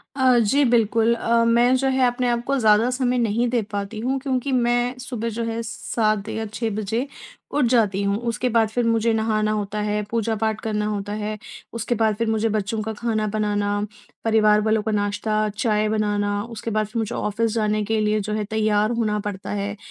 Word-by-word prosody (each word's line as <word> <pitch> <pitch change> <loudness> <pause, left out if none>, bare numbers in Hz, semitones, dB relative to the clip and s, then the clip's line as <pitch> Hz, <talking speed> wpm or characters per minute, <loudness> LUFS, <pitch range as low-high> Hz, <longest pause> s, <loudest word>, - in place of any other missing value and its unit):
अ, 260 -2 +4
जी 250 +7 +3
बिल्कुल 230 -1 +3
अ, 230 0 +2
मैं 240 +2 +4
जो 270 +1 0
है 260 -1 +3
अपने 245 0 0
आप 235 0 0
को 275 - +1
ज़्यादा 220 +2 +4
समय 250 -1 0
नहीं 235 +1 +1
दे 240 -2 +1
पाती 205 +2 -4
हूँ। 260 +4 -1
क्योंकि 265 0 -2
मैं 245 0 +1
सुबह 245 -2 -4
जो 230 +1 -3
है 230 0 -2
7 215 -2 -1
या 220 0 -3
6 230 0 -1
बजे 220 +5 -2 0.4
उठ 290 -4 +2
जाती 215 -5 +2
हूँ। 200 +1 +1
उसके 245 +3 -1
बाद 225 -1 +2
फिर 240 +2 -1
मुझे 230 0 +2
नहाना 215 -1 +1
होता 210 0 -2
है, 210 0 0
पूजा 225 -1 0
पाठ 220 0 -1
करना 210 -1 -1
होता 205 -1 -3
है। 215 0 -3 0.4
उसके 230 +1 -1
बाद 220 -1 +2
फिर 230 +1 -1
मुझे 220 0 +1
बच्चों 215 +1 -1
का 220 0 -4
खाना 215 -1 -1
बनाना, 205 -1 0 0.4
परिवार 215 -1 +4
वालों 220 0 +2
का 220 - -1
नाश्ता-चाय 215 +1 0
बनाना, 205 -1 0
उसके 230 -1 -6
बाद 215 -1 0
फिर 230 +2 -4
मुझे 220 - -2
ऑफ़िस 220 +2 -1
जाने 215 -1 0
के 220 +1 0
लिए 215 0 +1
जो 210 +1 -3
है 215 -1 -1
तैयार 215 0 +1
होना 220 -3 0
पड़ता 200 -2 -5
है। 205 0 -3
220 Hz, 200 wpm, -23 LUFS, 210-235 Hz, 0.4 s, अ